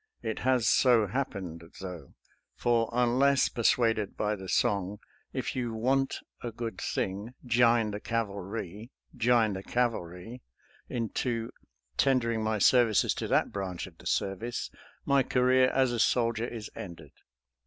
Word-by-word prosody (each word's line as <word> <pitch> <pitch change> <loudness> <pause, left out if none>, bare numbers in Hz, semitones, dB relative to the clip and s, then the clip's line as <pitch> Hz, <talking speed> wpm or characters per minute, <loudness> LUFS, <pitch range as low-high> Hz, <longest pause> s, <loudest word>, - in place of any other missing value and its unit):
It 110 -2 -3
has 125 -4 +2
so 120 -4 +5
happened, 95 -8 -4 0.2
though, 90 -3 -8 0.4
for 115 -2 +1
unless 125 +3 +3
per 120 - -5
suaded 115 -3 +2
by 105 0 0
the 95 -2 -9
song, 100 0 +1 0.2
" - - -34
If - - -3
you 120 -3 -2
want 135 +4 0 0.2
a 120 - -4
good 115 -3 -5
thing, 100 +6 -3
jine 115 -2 +3
the 105 - -4
cavalry, 105 -1 -4 0.3
jine 115 -3 +3
the 95 - -5
cavalry," 115 -1 -2 0.5
into 115 0 -2 0.5
tender 130 -4 +3
ing 110 -1 -1
my 110 0 0
services 115 0 +4
to - - -4
that - - +2
branch 95 -3 -4
of - - -15
the - - -8
service, 110 +5 -2 0.3
my 140 0 +4
career 130 0 +3
as 130 -2 +2
a 120 - -2
soldier 115 0 +2
is 110 -3 -7
ended. 85 -6 -9
115 Hz, 145 wpm, -29 LUFS, 100-125 Hz, 0.5 s, so